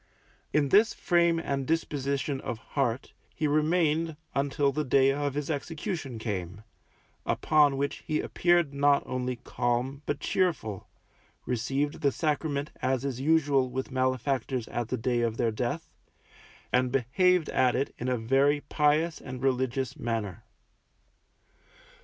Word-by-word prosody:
In 145 -2 +2
this 215 - +5
frame 170 -1 +3
and 140 -5 -2
disposition 140 -3 -1
of 115 - -4 0.2
heart 130 -3 -1 0.2
he 155 - 0
remained 160 +1 +1 0.2
until 140 0 +1
the 150 +3 -1
day 135 0 +4
of 145 0 -2
his 145 +2 -2
execution 155 - -4
came, 100 -3 -4 0.6
upon 145 -3 +3
which 140 0 -1
he 155 - -2
appeared 175 -4 +2
not 140 0 +3
only 125 0 -2
calm 120 +3 -2
but 145 - -1
cheerful, 155 - -1 0.6
received 135 +4 -1
the 140 - +3
Sacrament 150 -1 -1
as 130 0 0
is 130 -2 -3
usual 145 -3 +3
with 130 +2 -4
malefactors 130 -1 -1
at 120 -2 -2
the - - -2
day 120 +1 0
of 115 -1 -1
their 115 -2 +1
death, 135 +9 -3 0.8
and 125 0 +3
behaved 160 +7 +2
at 130 -1 +2
it 135 +2 -1
in 125 - -3
a 125 - +1
very 135 +5 +2
pious 150 +3 +1
and 130 -1 -7
religious 130 0 0
manner. 110 -6 -3
140 Hz, 135 wpm, -28 LUFS, 125-150 Hz, 0.8 s, this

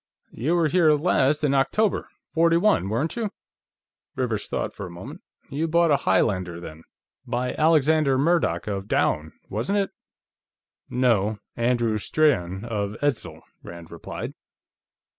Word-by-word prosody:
"You 150 +10 -1
were 170 -2 +3
here 160 -1 +4
last 150 -2 +2
in 140 -2 +2
October, 195 +10 +1 0.2
'41, 165 - +3
weren't 135 +10 -1
you?" 230 -3 -2 0.9
Rivers 120 -5 -2
thought - - -3
for 100 - -7
a - - -10
moment. 85 0 -10 0.3
"You 155 +4 -1
bought 170 0 +3
a 145 - +5
Highlander, 95 -4 0
then. 80 -1 -10 0.4
By 125 +1 -1
Alexander 155 -3 +3
Murdoch, 140 - +1
of 100 -1 -4
Doune, 80 -5 0 0.2
wasn't 120 - -1
it?" 200 -1 0 1.0
"No; 110 -4 +1 0.2
Andrew 120 -2 +1
Strahan, 100 - +1
of 105 -3 -3
Edzel," 145 -5 -2 0.2
Rand 85 -1 -11
replied. 85 - -6
125 Hz, 130 wpm, -24 LUFS, 100-160 Hz, 1.0 s, a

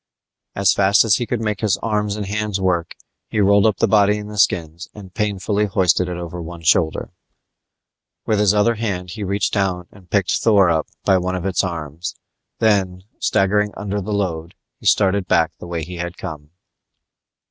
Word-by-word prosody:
As 100 0 +3
fast 100 +1 +4
as 105 -3 +4
he 120 - -3
could 120 -2 -2
make 105 -2 -2
his 105 -4 +1
arms 105 -2 -1
and 105 -1 -4
hands 105 0 -2
work 90 -3 -1 0.3
he 110 - -2
rolled 100 +1 +5
up 105 - +1
the 115 - +2
body 105 0 +4
in 105 0 -7
the 105 -1 -6
skins 85 -2 0
and 95 -3 -11
painfully 105 0 0
hoisted 90 -2 +2
it 90 - -4
over 85 0 -6
one 85 0 -9
shoulder. 80 -1 +1 1.1
With 110 -2 +1
his 105 -2 +4
other 105 +3 +3
hand 95 -6 -3
he 105 +4 -6
reached 100 +1 -1
down 95 -3 0
and 95 -3 -18
picked 100 -3 +1
Thor 100 -6 +4
up 80 -1 0 0.2
by 95 -1 +4
one 90 +1 -2
of 90 0 -4
its 95 0 +1
arms, 85 -2 -5 0.4
then, 95 -4 +1 0.2
staggering 105 +1 +1
under 105 0 -3
the 100 +3 -5
load, 90 -3 -2 0.2
he - - -5
started 95 -1 +3
back 80 -2 +2
the - - -9
way 85 -2 -3
he 90 +3 -7
had 85 0 -5
come. 75 -1 -8
95 Hz, 190 wpm, -20 LUFS, 90-105 Hz, 1.1 s, rolled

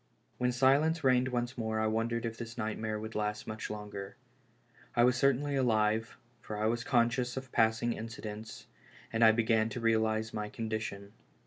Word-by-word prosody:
AVhen 125 0 +3
silence 140 +6 +3
reigned 130 -1 +4
once 120 0 -2
more 110 -1 -1
I 110 - +1
wondered 115 +2 0
if 115 -1 -3
this 115 0 -8
nightmare 110 -1 -2
would 110 +1 -6
last 105 0 -2
much 110 0 -5
longer. 105 -2 -6 0.8
I 120 - +5
was 125 0 +4
certainly 140 +2 +2
alive, 110 -3 +1 0.2
for 105 - -6
I 105 - 0
was 115 +1 0
conscious 125 +1 +1
of 130 -1 -6
passing 110 +1 +2
incidents, 110 -1 -7 0.5
and 115 +1 +3
I 110 - +9
be 115 +1 +1
gan 110 -1 +2
to 120 - -5
realize 110 -1 +1
my 105 -1 -3
condition. 110 -3 -4
115 Hz, 175 wpm, -32 LUFS, 110-120 Hz, 0.8 s, I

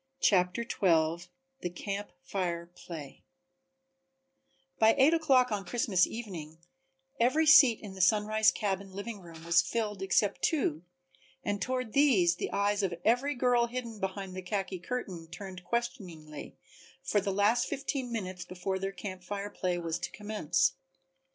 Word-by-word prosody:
CHAPTER 180 +1 +3
XII 170 -5 +1 0.3
The 175 - -3
Camp 200 +3 -5
Fire 175 -3 -2
Play 165 -4 -10 1.6
By 220 0 +6
eight 280 +5 +6
o'clock 270 -7 +4
on 205 -2 -1
Christmas 200 -5 +2
evening 175 -9 -7 0.6
every 260 +7 +3
seat 280 -7 +8
in 205 -3 -8
the 190 - -5
Sunrise 215 +3 +4
cabin 195 -2 -2
living 205 +2 -6
room 165 -2 -12
was 170 +1 +5
filled 210 -3 -3
except 195 +1 +1
two, 165 - +1 0.6
and 205 -1 -2
toward 255 -3 -2
these 200 -12 +4
the - - -3
eyes 205 +1 +1
of 185 -3 -1
every 255 +5 +2
girl 245 -1 +3
hidden 235 -3 -6
behind 190 -1 -4
the 185 - -4
khaki 190 0 -3
curtain 180 -5 -5
turned 185 +1 -9
questioningly 175 - -5 0.5
for 205 - +1
the 200 0 -1
last 205 +5 +2
fifteen 270 -2 -3
minutes 185 -5 -4
before 190 +1 -3
their 195 +1 -2
Camp 190 -2 -7
Fire 205 +2 -5
play 180 -1 -1
was 170 -1 -3
to - - -3
commence. 210 - 0
200 Hz, 145 wpm, -30 LUFS, 180-235 Hz, 1.6 s, seat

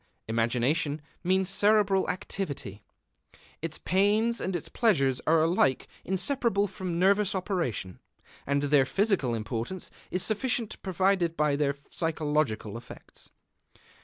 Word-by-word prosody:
Imagination 125 +7 0 0.2
means 190 +1 +2
cerebral 205 0 +3
activity: 140 - -4 0.8
its 160 -1 -2
pains 210 +5 +2
and 190 0 -2
its 175 - -4
pleasures 140 - +2
are 160 0 +4
alike 160 -6 +2 0.2
inseparable 200 +2 +1
from 185 -3 -4
nervous 200 +2 +3
operation, 170 - -2 0.5
and 140 +1 +1
their 140 -2 +3
physical 195 - +1
importance 115 +10 -4 0.2
is 185 - +1
sufficiently 230 0 -1
proved 185 -2 +1
by 150 -2 +2
their 140 -1 +1
physiological 145 - -2
effects. 120 - -12
170 Hz, 110 wpm, -28 LUFS, 140-195 Hz, 0.8 s, are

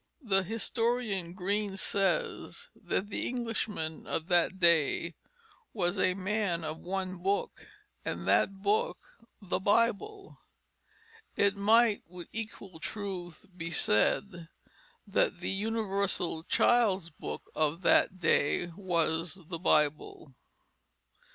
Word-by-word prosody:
The 195 -5 +3
historian 220 -3 -1
Green 200 +1 -1
says 315 - -1
that 205 - -3
the - - -2
Englishman 220 -9 -3
of 165 +3 -3
that 175 +1 +3
day 170 -1 +3 0.6
was 185 -2 0
a 185 -1 +2
man 190 -3 -1
of 155 0 -4
one 185 0 -3
book, 195 +3 -2 0.4
and 85 +2 -4
that 110 - +2
book 455 - +1 0.5
the 185 -1 -1
Bible. 230 - 0 1.0
It 200 0 +3
might 215 +2 +4
with 175 0 -10
equal 205 -6 -7
truth 180 -4 -6
be 165 -2 -4
said 170 - +1 0.6
that - - +1
the - - -2
universal 200 -5 -1
child's 220 -8 +3
book - - -7
of 155 +3 0
that 185 +1 +4
day 170 +1 +2
was 170 -3 0
the 170 -2 -4
Bible. 150 -3 0
190 Hz, 110 wpm, -30 LUFS, 170-210 Hz, 1.0 s, might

